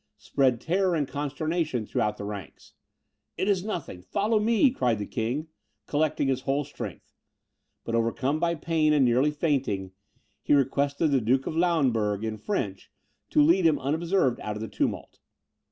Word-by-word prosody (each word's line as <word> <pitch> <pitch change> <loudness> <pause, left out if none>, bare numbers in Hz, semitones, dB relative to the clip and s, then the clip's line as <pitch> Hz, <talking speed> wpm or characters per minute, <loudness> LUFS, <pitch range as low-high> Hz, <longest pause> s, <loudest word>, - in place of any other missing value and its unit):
spread 130 -4 +1
terror 180 +4 +1
and 145 -4 0
consternation 150 -2 -2
through - - -2
all 105 - +2
the 105 - -9
ranks. 100 -4 -8 0.6
"It 190 - -1
is 195 -3 +2
nothing 170 - -5
follow 210 - 0
me," 230 +5 +3
cried 125 - 0
the 105 - -4
king, 125 +10 -3 0.4
collecting 155 -1 0
his 130 -1 0
whole 140 +2 0
strength; - - -8 0.7
but 115 - -5
overcome 120 +6 0
by 170 0 +1
pain, 155 -1 +1
and 145 -3 +4
nearly 125 +4 +3
fainting, 135 - -1 0.5
he - - +3
requested 140 +3 +1
the 135 -2 +3
Duke 130 +4 +1
of - - -4
Lauenburg, 125 - +1
in 110 -1 -3
French, 100 - -3 0.4
to 150 - +4
lead 170 +5 +4
him 155 - +3
unobserved 155 -1 0
out 105 - -4
of 105 - -6
the - - -4
tumult. - - -3
140 Hz, 165 wpm, -27 LUFS, 115-165 Hz, 0.7 s, and